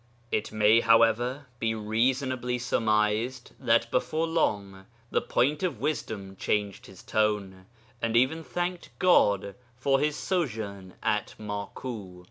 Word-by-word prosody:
It 105 - -1
may, 110 +1 +5
however, 115 +4 +3
be 110 -1 0
reasonably 125 +3 0
surmised 110 0 0
that - - +2
before 160 +1 0
long 100 -12 -1 0.2
the - - +2
Point 145 +5 +1
of 165 - -1
Wisdom 110 -8 -3
changed 105 0 -1
his 95 -2 -14
tone, 100 -3 -1 0.3
and 115 0 +1
even 135 +7 +2
thanked 175 +6 -3
God 100 - +3 0.2
for 135 +2 +2
his 150 +1 +1
sojourn 110 - -3
at - - 0
Maku. 105 -2 -6
115 Hz, 120 wpm, -28 LUFS, 105-130 Hz, 0.3 s, may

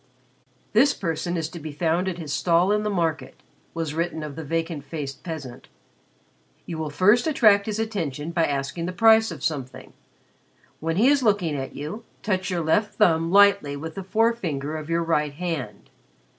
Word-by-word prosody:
"This 270 +7 +4
person 175 0 -2
is 160 -2 -2
to 170 - -9
be 155 0 -7
found 165 +4 0
at 180 -2 -2
his 155 -4 -5
stall 175 +5 +2
in 210 0 +2
the 210 - -1
market," 165 -5 -2 0.4
was 165 -3 -3
written 165 -1 -2
of 150 -2 -7
the 160 - -6
vacant 165 0 -3
faced 140 -2 -6
peasant. 155 -8 -7 1.0
"You 165 -2 -5
will 155 -1 -3
first 205 - +3
attract 215 -9 +4
his 215 -1 -2
attention 170 -9 -3
by 165 -1 +2
asking 140 +4 -3
the 185 - -4
price 225 +2 +5
of - - -8
something. 135 -5 -4 0.9
When 165 +1 -2
he 220 +8 +4
is 285 -1 +3
looking 200 -9 +1
at 135 -1 -5
you, 160 +11 -6 0.2
touch 185 -2 -1
your 175 -2 -1
left 205 +7 +1
thumb 165 -5 +3
lightly 200 -8 +5
with 160 +2 -6
the 195 - -6
forefinger 185 -9 0
of 155 0 -6
your 170 0 +1
right 150 -3 0
hand. 145 - -5
165 Hz, 180 wpm, -24 LUFS, 150-200 Hz, 1.0 s, price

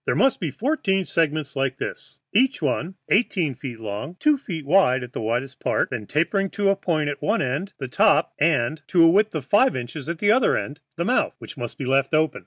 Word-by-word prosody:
"There - - +1
must 270 - +3
be 165 - -2
fourteen 195 - 0
segments 155 -4 -1
like 135 -1 -1
this, - - -7 0.2
each 265 +2 +3
one 155 +5 -2
eighteen 185 - +1
feet 125 -2 -8
long 105 -2 -5
and 175 +4 -14
two 300 0 +4
feet 170 - -6
wide 140 -6 +3
at 125 - -10
the - - -4
widest 125 +5 -2
part, - - 0
then 110 -5 -5
tapering 175 +6 0
to 200 -1 +2
a 195 - +3
point 160 -6 -1
at 145 - -4
one 220 +3 +1
end, 145 +10 -3
the 135 - -5
top, 200 +10 +3
and 150 -1 +1
to 175 -3 +4
a - - +8
width 210 +1 +2
of 150 -5 -3
five 230 - +3
inches 130 +5 -6
at 170 - -3
the 205 +4 +3
other 250 +2 +3
end, 145 +1 -5 0.2
the 170 +1 -2
mouth, 250 - +1
which - - -10
must 120 -4 -6
be 135 - -5
left 135 +3 +2
open. 155 0 +1
160 Hz, 230 wpm, -23 LUFS, 135-195 Hz, 0.2 s, a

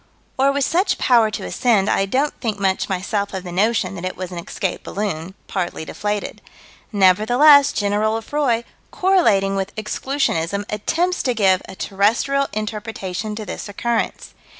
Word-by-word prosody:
Or 270 +1 +3
with 280 -1 +1
such 360 +5 +1
power 235 -4 +4
to 210 - -5
ascend, 215 -6 +2
I 195 - +1
don't 275 +8 0
think 220 -4 -2
much 195 +1 0
myself 200 +2 -2
of 185 - -4
the 180 - -7
notion 205 +4 +1
that 180 -2 -7
it 185 - -4
was 185 0 -5
an 175 - -5
escaped 180 +2 -4
balloon, 190 -3 -4
partly 175 -4 -3
deflated. 205 +4 -4 0.5
Nevertheless, 245 +9 +5
General 210 0 0
Lefroy, 235 0 0 0.3
correlating 225 - +2
with 195 0 -3
Exclusionism, 210 - -1
attempts 335 - 0
to 250 -3 0
give 190 -4 +3
a 190 - -8
terrestrial 230 +9 +1
interpretation 215 -1 -4
to 215 0 -6
this 205 - -6
occurrence. 235 +3 -2
210 Hz, 150 wpm, -20 LUFS, 195-245 Hz, 0.5 s, Nevertheless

